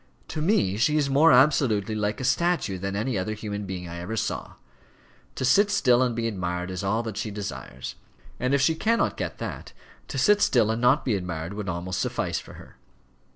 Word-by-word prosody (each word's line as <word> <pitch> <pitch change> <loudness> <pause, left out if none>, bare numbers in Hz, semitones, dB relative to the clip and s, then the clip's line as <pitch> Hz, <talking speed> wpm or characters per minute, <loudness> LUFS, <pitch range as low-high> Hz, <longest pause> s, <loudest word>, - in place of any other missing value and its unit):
To 155 - -4
me 150 - +2
she 150 +7 +2
is 140 -2 +1
more 155 +4 +6
absolutely 125 -7 +3
like 105 0 -1
a - - -4
statue 150 - +1
than 100 +1 -3
any 110 +1 -1
other 110 +4 -3
human 105 -1 -5
being 90 -2 -5
I 85 0 -7
ever 95 +6 -4
saw. - - -3 0.8
To 130 - -2
sit 200 +11 +4
still 125 -11 +3
and 125 -2 +1
be 115 0 -1
admired 90 -3 -3
is 95 +2 -4
all 110 +4 0
that 110 -3 -5
she 110 - -2
desires; 100 - -6 0.5
and 130 +2 +1
if 140 - +2
she 150 +5 +4
cannot 225 +8 +1
get - - -4
that, - - -6 0.3
to - - -5
sit 205 0 +4
still 115 -4 +3
and 115 +1 -2
not 125 +4 +3
be 120 - +1
admired 90 -2 -3
would 100 -2 -4
almost 90 +1 -3
suffice - - -1
for - - -12
her. - - -14
110 Hz, 205 wpm, -26 LUFS, 95-135 Hz, 0.8 s, more